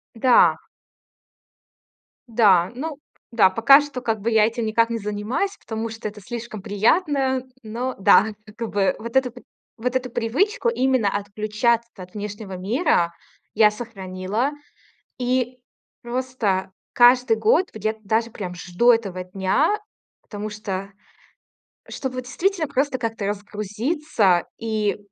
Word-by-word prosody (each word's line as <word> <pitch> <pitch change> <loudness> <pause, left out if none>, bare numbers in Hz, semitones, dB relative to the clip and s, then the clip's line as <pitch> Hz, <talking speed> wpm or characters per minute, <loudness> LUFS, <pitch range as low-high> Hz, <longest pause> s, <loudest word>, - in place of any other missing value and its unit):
Да. 245 +2 +5 1.7
Да, 205 -6 +4
ну 295 +2 -5 0.3
да. 205 -5 +5
Пока 275 +8 +6
что, 285 -3 -6
как 225 -3 -1
бы, 230 - 0
я 220 -1 +5
этим 230 +1 -2
никак 230 +1 +2
не 230 - -2
занимаюсь, 210 - -2
потому 220 0 -5
что 225 0 -6
это 210 0 -9
слишком 230 -1 -7
приятно. 265 - +1 0.2
Но 240 +4 -4
да. 195 +2 +6 0.3
Как 230 -1 -4
бы 200 -1 +1
вот 230 +2 -8
эту 260 -2 +2 0.4
вот 250 +3 -2
эту 255 -1 -1
привычку 380 - 0
именно 260 - +2
отключаться 215 +3 -1
от 180 -1 -11
внешнего 205 -1 -6
мира 195 - +1 0.4
я 210 -1 +5
сохранила. 210 +2 -3 0.7
И 250 0 -1 0.4
просто 240 -7 -2 0.2
каждый 245 -1 +5
год, 425 - +2
где-то 220 +1 -3
даже 225 +2 0
прям 185 -5 -6
жду 180 +7 +2
этого 195 -6 +1
дня, 195 - +1 0.4
потому 210 0 -6
что, 195 -2 -5 1.0
чтобы 255 -2 -4
действительно 335 +6 -1
просто 270 0 0
как-то 225 -3 -3
разгрузиться 210 - 0
и, 215 -2 -1
225 Hz, 125 wpm, -23 LUFS, 205-255 Hz, 1.7 s, Пока